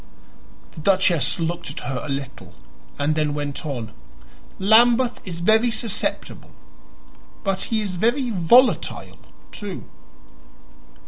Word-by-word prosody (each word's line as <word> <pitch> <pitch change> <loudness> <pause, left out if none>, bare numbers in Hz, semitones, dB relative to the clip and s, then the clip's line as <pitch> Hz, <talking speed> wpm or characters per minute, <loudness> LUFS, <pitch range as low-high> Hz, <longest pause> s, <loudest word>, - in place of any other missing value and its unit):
The - - -12
duchess 185 -2 +2
looked 170 +1 -3
at - - -7
her 130 -2 -4
a 150 - -7
little 135 - -6 0.4
and 145 +2 +1
then 150 -1 -1
went 145 +1 -4
on; 120 -6 -5 0.7
"Lambeth 235 +5 +4
is 170 -2 -5
very 220 +6 +4
susceptible, 220 -2 -3 0.9
but 195 -2 -1
he 225 -2 -1
is 185 -3 -5
very 240 +5 +1
volatile, 230 +7 +3 0.4
too." 205 -4 -7
185 Hz, 115 wpm, -22 LUFS, 150-220 Hz, 0.9 s, Lambeth